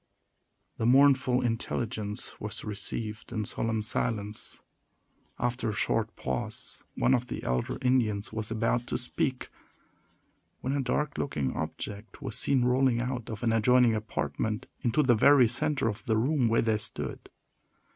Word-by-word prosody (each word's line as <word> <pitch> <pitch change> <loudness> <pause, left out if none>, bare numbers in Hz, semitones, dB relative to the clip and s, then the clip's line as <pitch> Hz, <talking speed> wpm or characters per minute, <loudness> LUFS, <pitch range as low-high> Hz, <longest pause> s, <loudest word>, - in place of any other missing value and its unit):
The 115 - +1
mournful 130 -1 +5
intelligence 115 -2 -2
was 105 0 -5
received 105 +1 -4
in 110 -3 -2
solemn 110 +1 0
silence. 105 -1 -2 0.8
After 120 -1 -1
a - - -2
short - - 0
pause, 65 -1 -4
one 130 - +3
of 125 -1 +1
the - - -5
elder 60 0 -1
Indians 115 -5 +1
was 110 -1 -3
about 115 +2 0
to - - -1
speak, 125 +1 -2 1.1
when 130 - -1
a 140 - +1
dark 140 +3 -1
looking 70 - -1
object 100 +7 -5
was - - -4
seen 130 -3 +3
rolling 125 -1 +3
out 125 -1 -3
of 110 -1 -6
an 115 -1 +2
adjoining 120 +1 +5
apartment, 110 -1 -2 0.2
into 125 +5 +2
the 125 -3 +5
very 130 +2 +6
center 120 +3 0
of 110 0 -3
the 110 -1 +2
room 130 +2 +2
where 115 +1 +3
they 110 -2 +1
stood. - - -4
115 Hz, 145 wpm, -29 LUFS, 110-125 Hz, 1.1 s, very